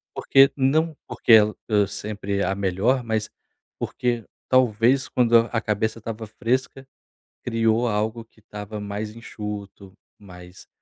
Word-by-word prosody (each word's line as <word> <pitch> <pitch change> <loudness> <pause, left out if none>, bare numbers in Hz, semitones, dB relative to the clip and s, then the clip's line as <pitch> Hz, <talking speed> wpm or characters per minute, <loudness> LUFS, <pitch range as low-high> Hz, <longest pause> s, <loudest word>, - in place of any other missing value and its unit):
Porque 135 0 +5
não 155 +4 +1
porque - - -1
el 105 -1 +6
é 105 -2 +3
sempre 100 0 -3
a 95 - 0
melhor, 100 +7 0
mas 110 -1 -2 0.5
porque 120 -2 -2 0.3
talvez 130 +1 +3
quando 120 -2 +4
a 115 - +1
cabeça 110 +1 -1
estava 110 0 -6
fresca 130 +4 -2 0.6
criou 115 0 +1
algo 110 +2 -1
que 115 - -27
estava 105 0 -8
mais 105 +1 -5
enxuto, 105 -4 -8 0.3
mais 90 -2 -14
110 Hz, 130 wpm, -23 LUFS, 105-120 Hz, 0.6 s, el